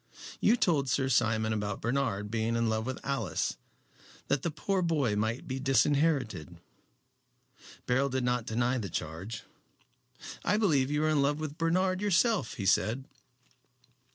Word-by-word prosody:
You 225 Hz, -, +4 dB
told 145 Hz, -, +2 dB
Sir 130 Hz, +1 st, +1 dB
Simon 110 Hz, -3 st, +2 dB
about 105 Hz, -2 st, -2 dB
Bernard 115 Hz, -5 st, -1 dB
being 115 Hz, 0 st, 0 dB
in 115 Hz, -1 st, +1 dB
love 110 Hz, +1 st, -1 dB
with 130 Hz, -, -3 dB
Alice, 115 Hz, -, -1 dB, 0.7 s
that 140 Hz, -1 st, +2 dB
the 170 Hz, -, -1 dB
poor 185 Hz, +5 st, -1 dB
boy 150 Hz, -11 st, +1 dB
might 110 Hz, +4 st, -2 dB
be 130 Hz, 0 st, -3 dB
disinherited." 140 Hz, -, +1 dB, 1.3 s
Beryl 130 Hz, +3 st, +2 dB
did 130 Hz, -1 st, -1 dB
not 125 Hz, -1 st, 0 dB
deny 120 Hz, +2 st, 0 dB
the 100 Hz, -4 st, -4 dB
charge. 90 Hz, +9 st, -5 dB, 1.0 s
"I 210 Hz, -, +2 dB
believe 150 Hz, -11 st, +2 dB
you 150 Hz, +1 st, 0 dB
are 155 Hz, -, +2 dB
in 150 Hz, -2 st, +3 dB
love 145 Hz, +2 st, +1 dB
with 155 Hz, -2 st, -4 dB
Bernard 185 Hz, +3 st, +1 dB
yourself," 205 Hz, -, +2 dB
he 100 Hz, -, -4 dB
said. 115 Hz, +6 st, +2 dB
130 Hz, 150 wpm, -30 LUFS, 110-150 Hz, 1.3 s, You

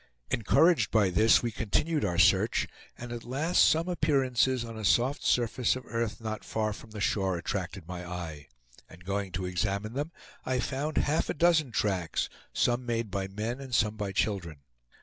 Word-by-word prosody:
Encouraged 120 Hz, -, +3 dB
by 105 Hz, -4 st, +3 dB
this 110 Hz, +7 st, +5 dB
we 120 Hz, -, -1 dB
continued 150 Hz, +9 st, 0 dB
our 90 Hz, -4 st, 0 dB
search, -, -, +4 dB, 0.3 s
and 120 Hz, 0 st, -8 dB
at 120 Hz, -1 st, -6 dB
last 145 Hz, +8 st, 0 dB
some 165 Hz, +2 st, +3 dB
appearances 130 Hz, -7 st, +1 dB
on 115 Hz, -1 st, -8 dB
a 110 Hz, -, -6 dB
soft 125 Hz, +7 st, +2 dB
surface 120 Hz, 0 st, +2 dB
of 130 Hz, -, -7 dB
earth 115 Hz, -2 st, -3 dB
not 110 Hz, -1 st, -5 dB
far 110 Hz, -1 st, -1 dB
from 105 Hz, -, -12 dB
the 105 Hz, -1 st, -8 dB
shore 95 Hz, -3 st, 0 dB
attracted 90 Hz, 0 st, -4 dB
my 90 Hz, 0 st, -6 dB
eye; 85 Hz, -5 st, -7 dB, 0.4 s
and 90 Hz, +2 st, -15 dB
going 100 Hz, 0 st, -2 dB
to 90 Hz, +1 st, -2 dB
examine 100 Hz, +4 st, -2 dB
them 145 Hz, +5 st, -3 dB, 0.3 s
I 130 Hz, -1 st, -1 dB
found 140 Hz, +5 st, -2 dB
half 150 Hz, +2 st, +1 dB
a -, -, -1 dB
dozen 155 Hz, -3 st, +3 dB
tracks, 95 Hz, -7 st, -1 dB, 0.2 s
some 120 Hz, +1 st, +1 dB
made 115 Hz, -3 st, -2 dB
by 95 Hz, 0 st, -2 dB
men 110 Hz, +6 st, -4 dB
and 130 Hz, -3 st, -4 dB
some 105 Hz, -1 st, +2 dB
by 105 Hz, -2 st, -3 dB
children. 95 Hz, -7 st, -2 dB
110 Hz, 180 wpm, -29 LUFS, 95-130 Hz, 0.4 s, this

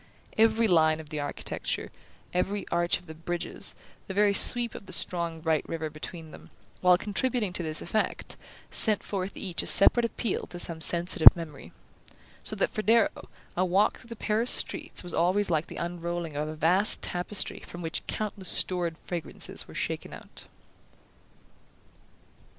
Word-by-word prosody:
Every 225 Hz, +1 st, +3 dB
line 160 Hz, -4 st, +3 dB
of 155 Hz, -2 st, -11 dB
the 155 Hz, -, -4 dB
architecture, 145 Hz, -, -4 dB, 0.4 s
every 190 Hz, +2 st, -1 dB
arch 170 Hz, 0 st, +1 dB
of 180 Hz, -, -20 dB
the 160 Hz, -, -9 dB
bridges, 170 Hz, +2 st, -2 dB, 0.3 s
the 190 Hz, -, -6 dB
very 205 Hz, 0 st, +3 dB
sweep 240 Hz, +3 st, +6 dB
of 200 Hz, -, -10 dB
the 185 Hz, -, -9 dB
strong 170 Hz, -2 st, -3 dB
bright 160 Hz, -1 st, +1 dB
river 160 Hz, -2 st, -4 dB
between 160 Hz, +1 st, -8 dB
them, -, -, -13 dB, 0.3 s
while 180 Hz, -1 st, +5 dB
contributing 210 Hz, +1 st, -1 dB
to 180 Hz, -, -1 dB
this 155 Hz, -2 st, -1 dB
effect, 215 Hz, +5 st, -2 dB, 0.4 s
sent 215 Hz, -2 st, +3 dB
forth 195 Hz, -1 st, -4 dB
each 180 Hz, -3 st, -3 dB
a -, -, -6 dB
separate 240 Hz, +4 st, +6 dB
appeal 230 Hz, -2 st, -3 dB
to 175 Hz, -, -9 dB
some 170 Hz, -2 st, -1 dB
sensitive 170 Hz, 0 st, +6 dB
memory; 155 Hz, -5 st, -9 dB, 0.7 s
so -, -, +1 dB
that, -, -, 0 dB
for 215 Hz, -, -3 dB
Darrow, 225 Hz, 0 st, +1 dB, 0.3 s
a 180 Hz, -, +1 dB
walk 190 Hz, +3 st, +2 dB
through -, -, -16 dB
the 230 Hz, -, -8 dB
Paris 220 Hz, +3 st, -1 dB
streets -, -, -1 dB
was 175 Hz, -, -4 dB
always 185 Hz, +3 st, +1 dB
like 160 Hz, 0 st, 0 dB
the -, -, -9 dB
unrolling 170 Hz, -2 st, -4 dB
of 150 Hz, +1 st, -2 dB
a 155 Hz, -, -6 dB
vast 180 Hz, +7 st, +2 dB
tapestry 180 Hz, +3 st, -1 dB
from 175 Hz, 0 st, -10 dB
which 160 Hz, -, -3 dB
countless 205 Hz, -3 st, -3 dB
stored 175 Hz, -3 st, +1 dB
fragrances 170 Hz, -3 st, -3 dB
were -, -, -13 dB
shaken -, -, -4 dB
out. -, -, -11 dB
175 Hz, 165 wpm, -27 LUFS, 165-205 Hz, 0.7 s, sweep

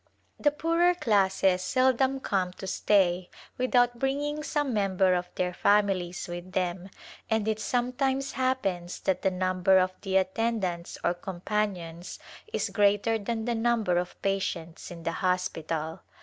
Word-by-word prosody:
The 295 Hz, -, +4 dB
poorer 335 Hz, +4 st, +2 dB
classes 195 Hz, -, +2 dB
seldom 260 Hz, +5 st, +2 dB
come 185 Hz, -5 st, -1 dB
to 190 Hz, -, -9 dB
stay 185 Hz, -2 st, +2 dB, 0.3 s
without 245 Hz, -1 st, +2 dB
bringing 290 Hz, +3 st, -1 dB
some 290 Hz, -3 st, -1 dB
member 190 Hz, -3 st, +2 dB
of 180 Hz, 0 st, -1 dB
their 180 Hz, 0 st, -1 dB
families 195 Hz, -3 st, +1 dB
with 175 Hz, +1 st, -7 dB
them, 180 Hz, 0 st, -2 dB, 0.4 s
and 220 Hz, -1 st, +1 dB
it 220 Hz, -1 st, 0 dB
sometimes 260 Hz, +3 st, 0 dB
happens 195 Hz, -10 st, -1 dB
that 190 Hz, -, 0 dB
the 190 Hz, -, +2 dB
number 185 Hz, 0 st, +2 dB
of 185 Hz, 0 st, +2 dB
the 190 Hz, -2 st, +1 dB
attend 215 Hz, +3 st, 0 dB
ants 170 Hz, -1 st, -5 dB
or 175 Hz, -, +2 dB
companions 180 Hz, -2 st, -3 dB, 0.3 s
is -, -, -1 dB
greater 205 Hz, +2 st, +2 dB
than 225 Hz, +1 st, -3 dB
the 240 Hz, -, 0 dB
number 225 Hz, -6 st, +1 dB
of 180 Hz, 0 st, -6 dB
patients 180 Hz, -4 st, -2 dB
in 170 Hz, -1 st, -9 dB
the 165 Hz, -, -1 dB
hospital. 165 Hz, -4 st, -1 dB
195 Hz, 145 wpm, -28 LUFS, 180-240 Hz, 0.4 s, The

